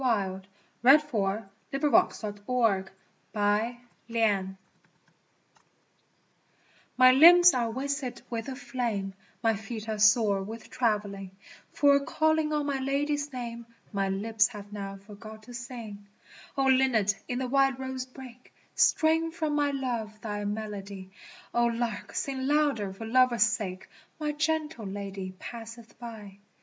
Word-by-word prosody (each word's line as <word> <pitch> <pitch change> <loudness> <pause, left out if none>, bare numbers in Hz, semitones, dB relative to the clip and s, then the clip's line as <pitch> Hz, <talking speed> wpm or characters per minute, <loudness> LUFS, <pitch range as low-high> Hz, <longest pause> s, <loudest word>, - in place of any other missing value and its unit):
[no] 195 -6 0 0.4
LA 270 +4 +9
BELLA 220 -8 -2 0.3
DONNA 295 +6 +3
DELIA 205 -1 -1 0.5
MIA 210 +3 +1 0.3
MENTE 205 -5 0 2.4
MY 255 0 +8
limbs 345 +6 +8
are 240 -3 0
wasted 265 0 -3
with 230 +1 -4
a 265 - -5
flame, 230 -8 -3 0.3
My 225 -1 +3
feet 220 +1 -7
are 215 -1 -3
sore 210 -2 +4
with 220 +3 -8
traveling, 205 -5 -1 0.4
For 285 -1 +4
calling 315 +2 +1
on 300 -1 0
my 280 -2 -1
Lady's 290 +2 -1
name 235 -2 -6 0.3
My 195 -1 0
lips 210 +3 +2
have 205 -3 -10
now 195 -1 -6
forgot 215 +2 -12
to 245 - -12
sing. 230 -4 -8 0.5
O 270 - +2
Linnet 255 -6 +3
in 245 - -2
the 260 0 -2
wild 270 0 +2
rose 260 -1 -5
brake 255 -1 -13 0.2
Strain 325 +1 +3
for 320 -2 -2
my 295 -1 +2
Love 240 -6 -3
thy 205 -2 -4
melody, 200 -2 -5 0.4
O 240 0 +3
Lark 230 -2 -3
sing 265 -1 -2
louder 285 -9 +1
for 195 +4 -8
love's 245 -1 +4
sake, 200 -5 -3 0.3
My 300 -1 -1
gentle 300 -5 -2
Lady 195 -1 -6
passeth 230 0 -10
by. 215 -5 -9
235 Hz, 130 wpm, -28 LUFS, 205-270 Hz, 2.4 s, LA